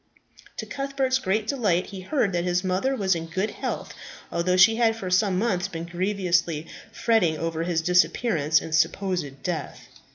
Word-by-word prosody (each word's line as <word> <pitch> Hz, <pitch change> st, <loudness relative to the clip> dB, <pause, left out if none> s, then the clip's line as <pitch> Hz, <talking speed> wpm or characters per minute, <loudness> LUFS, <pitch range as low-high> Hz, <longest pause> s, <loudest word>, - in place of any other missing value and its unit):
To -, -, -4 dB
Cuthbert's 275 Hz, -2 st, -1 dB
great 215 Hz, -2 st, 0 dB
delight 210 Hz, -9 st, +1 dB
he 195 Hz, -1 st, -8 dB
heard 205 Hz, -2 st, 0 dB
that 175 Hz, -1 st, 0 dB
his 180 Hz, +1 st, 0 dB
mother 190 Hz, +9 st, 0 dB
was 195 Hz, -6 st, +1 dB
in 165 Hz, -1 st, -4 dB
good 190 Hz, +6 st, -2 dB
health, -, -, -5 dB, 0.4 s
although 180 Hz, +2 st, +1 dB
she 225 Hz, +4 st, +6 dB
had 225 Hz, -2 st, +3 dB
for 190 Hz, -5 st, -5 dB
some 190 Hz, 0 st, +2 dB
months 190 Hz, -4 st, 0 dB
been 165 Hz, -3 st, -6 dB
grievously 175 Hz, -3 st, 0 dB, 0.3 s
fretting 220 Hz, -9 st, +2 dB
over 165 Hz, 0 st, -3 dB
his 165 Hz, -1 st, 0 dB
disappearance 170 Hz, -3 st, +2 dB
and 160 Hz, -, -7 dB
supposed 165 Hz, -4 st, 0 dB
death. 175 Hz, -3 st, -4 dB
185 Hz, 165 wpm, -25 LUFS, 170-215 Hz, 0.4 s, she